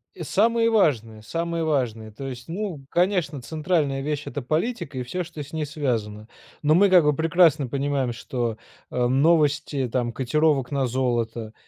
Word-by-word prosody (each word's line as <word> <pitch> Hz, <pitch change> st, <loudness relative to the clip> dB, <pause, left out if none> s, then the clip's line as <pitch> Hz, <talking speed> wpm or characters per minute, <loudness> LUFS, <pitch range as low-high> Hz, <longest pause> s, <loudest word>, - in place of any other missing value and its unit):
И -, -, -10 dB
самые 230 Hz, +3 st, +2 dB
важные, 115 Hz, -, +1 dB
самые 170 Hz, +4 st, -2 dB
важные, 120 Hz, -8 st, -1 dB
то 135 Hz, +6 st, -7 dB
есть, 125 Hz, -2 st, -8 dB
ну, 170 Hz, -5 st, -5 dB
конечно, 175 Hz, -6 st, +1 dB
центральная 150 Hz, 0 st, -1 dB
вещь- 150 Hz, 0 st, -2 dB
это 145 Hz, -4 st, -4 dB
политика 155 Hz, -, -2 dB
и -, -, -2 dB
всё, 180 Hz, +9 st, -3 dB
что 160 Hz, -2 st, -8 dB
с 145 Hz, -, -10 dB
ней 155 Hz, -1 st, -1 dB
связано. 115 Hz, -8 st, -3 dB, 0.3 s
Но 155 Hz, +1 st, +4 dB
мы, 200 Hz, +2 st, +5 dB
как 180 Hz, -3 st, +6 dB
бы, 150 Hz, -1 st, +2 dB
прекрасно 165 Hz, -3 st, +3 dB
понимаем, 135 Hz, -1 st, -1 dB
что, 120 Hz, -2 st, -3 dB, 0.3 s
э, 125 Hz, -1 st, +1 dB
новости 145 Hz, -1 st, +2 dB
там 120 Hz, -1 st, -1 dB
котировок 135 Hz, 0 st, +1 dB
на 140 Hz, -2 st, 0 dB
золото- 120 Hz, -3 st, -1 dB
145 Hz, 165 wpm, -24 LUFS, 125-165 Hz, 0.3 s, как